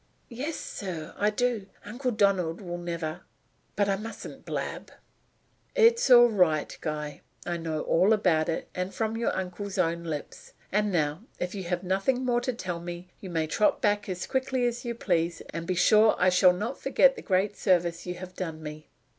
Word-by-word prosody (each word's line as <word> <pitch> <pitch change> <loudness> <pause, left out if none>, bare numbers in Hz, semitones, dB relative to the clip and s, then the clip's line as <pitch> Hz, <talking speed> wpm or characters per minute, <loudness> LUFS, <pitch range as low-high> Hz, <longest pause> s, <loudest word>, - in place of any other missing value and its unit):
"Yes, 280 +7 -4
sir, 170 -5 -6
I 210 - +2
do. 225 -2 -1 0.2
Uncle 245 +5 -3
Donald 195 -7 +1
will 175 -3 -5
never 170 -1 -4 0.5
But 205 0 +2
I 195 -1 +1
mustn't 225 +3 -8
blab." - - -4 0.9
"It's 465 - +5
all 240 -1 +9
right, 180 -8 +2
Guy. 150 -1 -4 0.2
I 175 -1 -2
know 160 -2 -3
all 185 +6 +3
about 175 -7 +3
it, 165 - -2
and 180 +1 -4
from 220 0 -1
your 230 +1 0
uncle's 190 +2 -4
own 170 -2 +1
lips. 155 -3 -6 0.2
And 210 +1 +1
now 155 -1 0 0.2
if 180 0 -3
you 195 -3 -5
have 175 +1 -2
nothing 195 +8 0
more 240 -1 +2
to 255 +1 -1
tell 180 -7 -4
me 175 +1 -7
you 190 - -8
may 165 -2 0
trot 185 +7 +2
back 205 -1 +1
as 180 -1 -3
quickly 260 -1 0
as 240 0 -1
you 235 -1 -3
please; 170 -6 0
and 165 +1 -5
be 185 - 0
sure 215 +4 +5
I 185 - +4
shall 180 0 +5
not 215 +9 -4
forget - - +4
the 450 - -8
great 195 +2 +1
service 175 -3 +1
you 180 - -3
have 185 +1 -9
done 160 -4 -5
me." 150 0 -8
185 Hz, 190 wpm, -28 LUFS, 170-220 Hz, 0.9 s, all